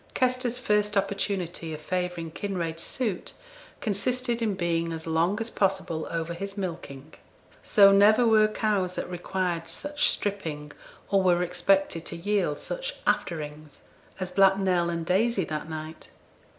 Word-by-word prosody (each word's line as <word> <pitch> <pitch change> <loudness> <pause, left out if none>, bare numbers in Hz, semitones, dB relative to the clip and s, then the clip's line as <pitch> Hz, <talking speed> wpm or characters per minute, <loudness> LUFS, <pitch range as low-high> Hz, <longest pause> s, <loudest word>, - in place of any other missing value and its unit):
Kester's 255 -1 +1
first 210 -3 +1
opportunity 190 -5 -1
of - - -9
favouring 175 0 -3
Kinraid's 170 -4 -3
suit 220 -5 -3 0.5
consisted 240 +3 0
in 215 -3 0
being 170 -2 -1
as 160 -1 -5
long 165 +5 +1
as 225 0 -3
possible 190 -5 0
over 165 0 -3
his 195 +3 -6
milking; 165 -8 -6 0.5
so 200 -1 +6
never 210 +4 +6
were 215 -1 +5
cows 205 -4 0
that - - -3
required 175 -1 -2
such 290 - 0
'stripping,' 160 -8 -3 0.4
or 195 -1 +4
were 180 -1 +3
expected 180 -1 +1
to - - -3
yield 180 -4 0
such - - -4
'afterings', 150 -3 -2 0.4
as 185 -1 -3
Black 195 +1 +5
Nell 180 -3 +1
and 170 -1 -3
Daisy 195 +2 +2
that 155 0 -5
night. 155 0 -7
185 Hz, 140 wpm, -27 LUFS, 165-205 Hz, 0.5 s, so